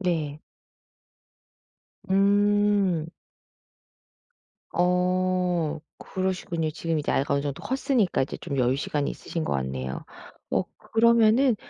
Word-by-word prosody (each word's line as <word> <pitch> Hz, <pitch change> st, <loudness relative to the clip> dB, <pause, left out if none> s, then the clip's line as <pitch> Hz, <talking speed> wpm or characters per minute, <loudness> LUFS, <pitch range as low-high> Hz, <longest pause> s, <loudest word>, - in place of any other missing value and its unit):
네. 155 Hz, -5 st, -1 dB, 1.7 s
음. 200 Hz, -3 st, +3 dB, 1.7 s
어 180 Hz, -2 st, +1 dB, 0.2 s
그러시군요. 185 Hz, -4 st, -2 dB
지금 165 Hz, 0 st, -2 dB
이제 145 Hz, -, -2 dB
아이가 140 Hz, +1 st, +1 dB
어느 140 Hz, -, +1 dB
정도 140 Hz, -2 st, -4 dB
컸으니까 260 Hz, -, +1 dB
이제 135 Hz, -, -4 dB
좀 140 Hz, -5 st, -4 dB
여유시간이 135 Hz, +3 st, 0 dB
있으신 165 Hz, -2 st, -5 dB
것 -, -, -2 dB
같네요. 65 Hz, 0 st, -3 dB, 0.5 s
어 -, -, +2 dB, 0.3 s
그러면은 235 Hz, +2 st, +5 dB
180 Hz, 220 characters per minute, -26 LUFS, 150-200 Hz, 1.7 s, 그러면은